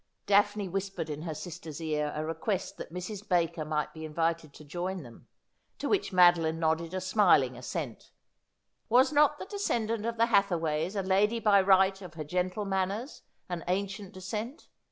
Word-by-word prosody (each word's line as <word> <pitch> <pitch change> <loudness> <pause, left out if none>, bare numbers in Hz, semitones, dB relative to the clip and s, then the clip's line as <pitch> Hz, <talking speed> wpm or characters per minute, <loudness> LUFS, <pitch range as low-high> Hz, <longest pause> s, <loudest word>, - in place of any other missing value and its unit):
Daphne 205 0 +3
whispered 190 -3 -3
in 150 0 -5
her 160 -2 -4
sister's 165 -2 -7
ear 150 -2 -1
a 155 +1 -2
request 170 +5 -3
that - - -8
Mrs. 195 +4 -6
Baker 170 -3 +1
might 150 0 -2
be 160 - -8
invited 165 0 -1
to 155 - -12
join 180 +3 -4
them, 120 -3 -14 0.5
to - - -3
which 405 - +1
Madoline 175 -3 +5
nodded 165 +2 0
a - - 0
smiling 185 - +3
assent. 125 +1 -6 0.8
Was 255 +6 +5
not 295 0 +4
the - - -7
descendant 230 - -1
of 235 0 -3
the 230 - +4
Hathaways 175 -5 +1
a 195 - -1
lady 205 +5 +2
by 205 -3 +5
right 190 0 +4
of 175 -3 -10
her 155 - -4
gentle 180 +6 -2
manners 195 +6 -2 0.3
and 175 -2 -4
ancient 195 +1 -2
descent 210 - -6
185 Hz, 170 wpm, -29 LUFS, 160-205 Hz, 0.8 s, Madoline